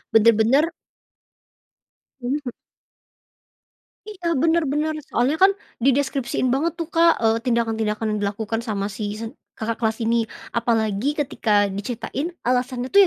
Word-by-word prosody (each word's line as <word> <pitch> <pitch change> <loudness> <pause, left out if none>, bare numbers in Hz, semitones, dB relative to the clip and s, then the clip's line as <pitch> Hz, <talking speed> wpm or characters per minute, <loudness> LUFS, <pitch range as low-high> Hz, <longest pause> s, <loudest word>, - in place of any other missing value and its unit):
Benar-benar 230 +8 +5 1.5
Mhm. 255 0 -3 1.5
Iya, 355 -6 -2
benar-benar. 310 0 +1 0.2
Soalnya 255 +6 +1
ka,n 385 +1 +7 0.3
dideskripsiin 265 -1 +1
banget 320 +5 0
tuh 335 -2 -4
Kak, 335 0 +5
eee, 225 0 +4
tindakan-tindakan 225 -2 0
yang 210 - -1
dilakukan 210 +2 -2
sama 210 -3 -3
si 205 +1 -4
se 225 +1 -6 0.2
kakak 225 +1 -3
kelas 220 -1 +1
ini. 230 0 +1 0.2
Apalagi 230 +3 0
ketika 215 -7 +2
diceritain, 240 - -4 0.2
alasannya 250 +1 -1
tuh 400 - +8
240 Hz, 115 wpm, -23 LUFS, 220-290 Hz, 1.5 s, tuh